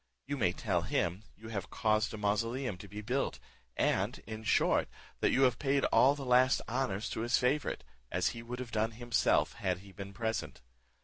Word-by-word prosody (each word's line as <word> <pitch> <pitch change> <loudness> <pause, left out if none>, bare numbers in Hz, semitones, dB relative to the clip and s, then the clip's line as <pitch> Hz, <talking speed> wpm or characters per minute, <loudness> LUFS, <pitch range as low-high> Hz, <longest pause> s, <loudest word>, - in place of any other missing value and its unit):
You 145 - -2
may 100 -10 +2
tell 90 -2 0
him, 85 +2 -1 0.2
you 110 +1 -10
have 100 -4 -4
caused 110 0 +1
a - - -6
mausoleum 115 +3 0
to - - -9
be 105 +1 -7
built, 125 +6 -1 0.4
and, - - +1
in 110 0 -7
short, - - +2 0.3
that - - +3
you 135 - +3
have 125 -3 +3
paid 140 -1 +2
all 140 +3 +6
the 140 -2 -6
last 125 +1 +5
honours 115 -4 -1
to - - -3
his 120 +2 +2
favourite, 135 - 0 0.3
as - - +1
he 115 - -7
would 120 +1 -6
have 125 -1 -6
done 110 +1 0
himself 120 +1 +2
had 90 -1 -2
he 100 - -13
been 100 0 -8
present. 110 +3 -3
115 Hz, 195 wpm, -32 LUFS, 105-125 Hz, 0.4 s, all